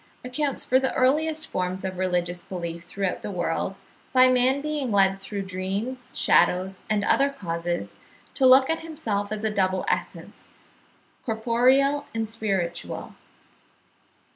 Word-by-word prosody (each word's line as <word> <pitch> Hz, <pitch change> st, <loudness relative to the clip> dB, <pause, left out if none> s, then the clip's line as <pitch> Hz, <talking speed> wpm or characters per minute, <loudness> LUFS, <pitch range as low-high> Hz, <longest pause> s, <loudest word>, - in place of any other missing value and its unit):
535), 250 Hz, -, -8 dB
accounts 290 Hz, -1 st, -1 dB
for 260 Hz, -, +4 dB
the 265 Hz, -, -1 dB
earliest 310 Hz, +4 st, +2 dB
forms 185 Hz, +1 st, -3 dB
of 185 Hz, -1 st, -4 dB
religious 175 Hz, -1 st, -1 dB
belief 170 Hz, -2 st, -6 dB
throughout 195 Hz, +1 st, -3 dB
the -, -, -5 dB
world, 180 Hz, +1 st, -2 dB, 0.4 s
by 255 Hz, 0 st, +7 dB
man 255 Hz, +2 st, +3 dB
being 295 Hz, -4 st, -2 dB
led 195 Hz, -1 st, +3 dB
through 200 Hz, 0 st, -5 dB
dreams, 195 Hz, +7 st, -4 dB
shadows, 185 Hz, +1 st, +3 dB
and 210 Hz, -2 st, +1 dB
other 275 Hz, +1 st, +3 dB
causes, 175 Hz, -9 st, -4 dB, 0.4 s
to 265 Hz, -, +4 dB
look 260 Hz, +1 st, +7 dB
at 325 Hz, -, 0 dB
himself 230 Hz, -12 st, -3 dB
as 215 Hz, 0 st, -4 dB
a 220 Hz, -, +1 dB
double 190 Hz, -2 st, +1 dB
essence, -, -, -4 dB, 0.7 s
corporeal 255 Hz, +5 st, +2 dB
and 225 Hz, -1 st, -1 dB
spiritual. 195 Hz, -6 st, -3 dB
215 Hz, 140 wpm, -25 LUFS, 185-260 Hz, 0.7 s, by